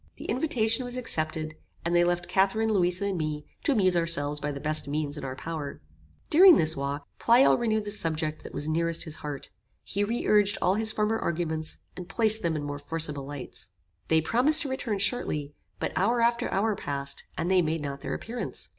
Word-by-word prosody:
The -, -, -10 dB
invitation 245 Hz, -4 st, +1 dB
was 245 Hz, 0 st, -3 dB
accepted, 155 Hz, -8 st, -1 dB, 0.3 s
and 170 Hz, +1 st, 0 dB
they 175 Hz, -, +5 dB
left 175 Hz, 0 st, -1 dB
Catharine, 215 Hz, +3 st, +1 dB
Louisa 180 Hz, 0 st, +1 dB
and 195 Hz, -3 st, -2 dB
me, 150 Hz, -1 st, -3 dB, 0.2 s
to 290 Hz, -, +2 dB
amuse 185 Hz, -6 st, +4 dB
ourselves 150 Hz, -4 st, +2 dB
by 145 Hz, 0 st, -3 dB
the 140 Hz, -, -6 dB
best 155 Hz, -1 st, 0 dB
means 145 Hz, 0 st, -2 dB
in 145 Hz, -, -6 dB
our 130 Hz, -1 st, -5 dB
power. 155 Hz, 0 st, -6 dB, 0.5 s
During 360 Hz, +1 st, +8 dB
this 160 Hz, +1 st, +3 dB
walk, 140 Hz, +1 st, -4 dB
Pleyel 240 Hz, +3 st, +5 dB
renewed 220 Hz, -3 st, -1 dB
the 205 Hz, -, -4 dB
subject 160 Hz, -5 st, -1 dB
that -, -, -10 dB
was 145 Hz, -, -2 dB
nearest 165 Hz, +1 st, 0 dB
his 155 Hz, -1 st, -4 dB
heart. 145 Hz, -2 st, -7 dB, 0.3 s
He 200 Hz, -, -1 dB
re 230 Hz, +4 st, -2 dB
urged 205 Hz, -1 st, +3 dB
all 185 Hz, -, +2 dB
his 220 Hz, +2 st, +1 dB
former 220 Hz, +1 st, 0 dB
arguments, 160 Hz, -2 st, -2 dB, 0.2 s
and 180 Hz, -1 st, -9 dB
placed 220 Hz, +3 st, +3 dB
them 170 Hz, -2 st, -1 dB
in 150 Hz, -, -3 dB
more 145 Hz, 0 st, -5 dB
forcible 150 Hz, -2 st, -3 dB
lights. 140 Hz, -9 st, -7 dB, 0.4 s
They 160 Hz, 0 st, +3 dB
promised 270 Hz, -, +5 dB
to 280 Hz, -, -4 dB
return 260 Hz, -5 st, -2 dB
shortly; 155 Hz, -, -1 dB, 0.3 s
but -, -, -3 dB
hour 235 Hz, +6 st, +1 dB
after 235 Hz, 0 st, +1 dB
hour 210 Hz, +2 st, 0 dB
passed, 140 Hz, -4 st, -2 dB
and 175 Hz, -, -1 dB
they 185 Hz, -1 st, +5 dB
made 160 Hz, -1 st, -1 dB
not 140 Hz, -1 st, -5 dB
their -, -, -4 dB
appearance. 240 Hz, +2 st, -6 dB
170 Hz, 200 wpm, -27 LUFS, 155-220 Hz, 0.5 s, During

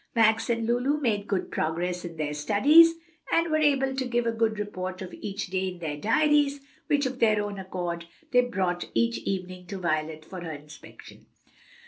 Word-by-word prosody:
Max 225 Hz, 0 st, +3 dB
and 230 Hz, -1 st, 0 dB
Lulu 245 Hz, +6 st, +1 dB
made 210 Hz, -7 st, 0 dB
good 195 Hz, -3 st, -2 dB
progress 175 Hz, +3 st, -2 dB
in 170 Hz, -2 st, -7 dB
their 150 Hz, -1 st, -2 dB
studies, 290 Hz, -, +6 dB, 0.4 s
and 335 Hz, -1 st, +2 dB
were 310 Hz, -, +3 dB
able 270 Hz, -3 st, +2 dB
to 260 Hz, -1 st, -2 dB
give 240 Hz, -1 st, 0 dB
a 230 Hz, -, +2 dB
good 225 Hz, -1 st, 0 dB
report 185 Hz, -3 st, -4 dB
of 185 Hz, -, -9 dB
each 200 Hz, 0 st, -5 dB
day 190 Hz, 0 st, 0 dB
in 180 Hz, -1 st, -5 dB
their 160 Hz, -4 st, -4 dB
diaries, 290 Hz, -, +2 dB, 0.3 s
which, 290 Hz, -1 st, +2 dB
of 260 Hz, 0 st, -3 dB
their 215 Hz, -2 st, +4 dB
own 205 Hz, -1 st, -5 dB
accord, 175 Hz, -3 st, -4 dB, 0.3 s
they 250 Hz, -, +6 dB
brought 185 Hz, -7 st, -2 dB
each 115 Hz, 0 st, +1 dB
evening 185 Hz, +4 st, -4 dB
to 200 Hz, -, -5 dB
Violet 155 Hz, -3 st, -2 dB
for 185 Hz, +1 st, -8 dB
her 165 Hz, -2 st, -5 dB
inspection. 150 Hz, +1 st, -13 dB
200 Hz, 185 wpm, -27 LUFS, 175-245 Hz, 0.4 s, studies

